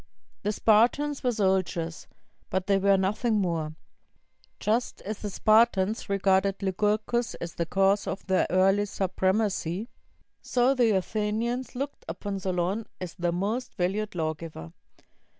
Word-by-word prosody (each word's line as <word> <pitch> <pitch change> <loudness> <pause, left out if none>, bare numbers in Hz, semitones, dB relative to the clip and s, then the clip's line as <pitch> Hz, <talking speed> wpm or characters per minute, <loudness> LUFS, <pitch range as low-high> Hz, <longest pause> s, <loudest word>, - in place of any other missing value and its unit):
The 210 - 0
Spartans 240 +8 +3
were 250 - +2
soldiers, 190 -6 -1 0.4
but 190 0 -1
they 195 0 +3
were 195 0 +4
nothing 210 +5 0
more. 165 -6 -1 0.8
Just 225 +4 0
as 210 +1 -5
the 210 - -4
Spartans 215 -1 +3
regarded 195 0 +2
Lycurgus 210 +4 0
as 170 - -6
the 170 - -2
cause 195 +3 +2
of 195 - -4
their 190 -1 +2
early 195 +3 +3
supremacy, 190 +1 -1 0.5
so 250 +2 +2
the 245 -4 +3
Athenians 220 +6 -1
looked 275 +3 -4
upon 195 +4 -4
Solon 185 +3 -1
as 180 -2 -6
their 175 0 -1
most 210 +8 -2
valued 195 +3 -1
lawgiver. 155 - -4
195 Hz, 130 wpm, -27 LUFS, 185-220 Hz, 0.8 s, were